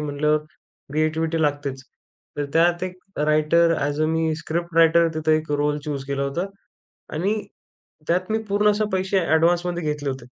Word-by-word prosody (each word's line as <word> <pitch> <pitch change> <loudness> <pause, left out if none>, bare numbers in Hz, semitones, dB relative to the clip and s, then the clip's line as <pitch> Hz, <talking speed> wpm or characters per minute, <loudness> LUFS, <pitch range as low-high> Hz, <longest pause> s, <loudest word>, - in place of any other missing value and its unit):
म्हटल्यावर 150 +1 +1 0.5
क्रिएटिव्हिटी 160 +2 0
लागतेच. 145 -3 -1 0.5
तर 145 - -1
त्यात 175 +2 +3
एक 185 0 -6 0.3
writer 155 +2 +4
as 145 0 -2
a - - +4
me 160 0 0
script 170 +1 -4
writer 165 0 +5
तिथं 155 0 +1
एक 155 0 0
रोल 145 0 +1
चूज 145 -3 -4
केला 140 0 -2
होता 140 +6 -1 0.7
आणि 185 +7 0 0.7
त्यात 180 +4 0
मी 220 - +2
पूर्ण 205 +1 +3
असे 210 +1 0
पैसे 190 +1 +1
ॲडव्हान्समध्ये 175 +2 +2
घेतले 150 -2 -2
होते. 130 -2 -6
160 Hz, 155 wpm, -23 LUFS, 150-170 Hz, 0.7 s, writer